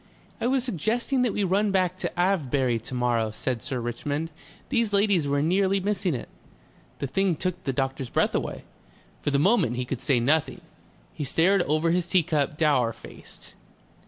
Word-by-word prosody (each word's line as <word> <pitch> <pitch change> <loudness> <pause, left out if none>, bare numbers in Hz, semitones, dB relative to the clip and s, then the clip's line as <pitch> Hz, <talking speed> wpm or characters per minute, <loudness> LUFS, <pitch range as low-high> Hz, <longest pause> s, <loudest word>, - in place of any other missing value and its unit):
"I - - +1
was 260 0 +1
suggesting 240 - 0
that 245 -3 +2
we 205 - -1
run 200 +2 +2
back 185 -2 +1
to 180 -1 -4
Avebury 140 -10 +1
to 115 +3 -8
morrow," 120 -3 +1
said 115 +2 -3
Sir 130 0 -3
Richmond. 145 +7 -3 0.4
"These 230 -5 +1
ladies 200 -6 +3
were 140 0 +1
nearly 190 +4 +2
missing 190 -4 -1
it." 120 - -6 0.7
The - - -3
thing 180 +6 +1
took 180 +3 -3
the 135 - +1
doctor's 135 -1 -2
breath - - +1
away. - - -3 0.6
For - - -1
the 140 - +2
moment 170 - +3
he 125 0 -2
could 125 -1 -4
say 135 -5 +2
nothing. 145 +6 +1 0.5
He - - -4
stared 175 +7 +3
over 155 +3 +2
his 175 0 0
tea 180 -1 +3
cup 150 -3 -1
dour 140 -8 +2
faced. - - -13
160 Hz, 180 wpm, -26 LUFS, 135-195 Hz, 0.7 s, ladies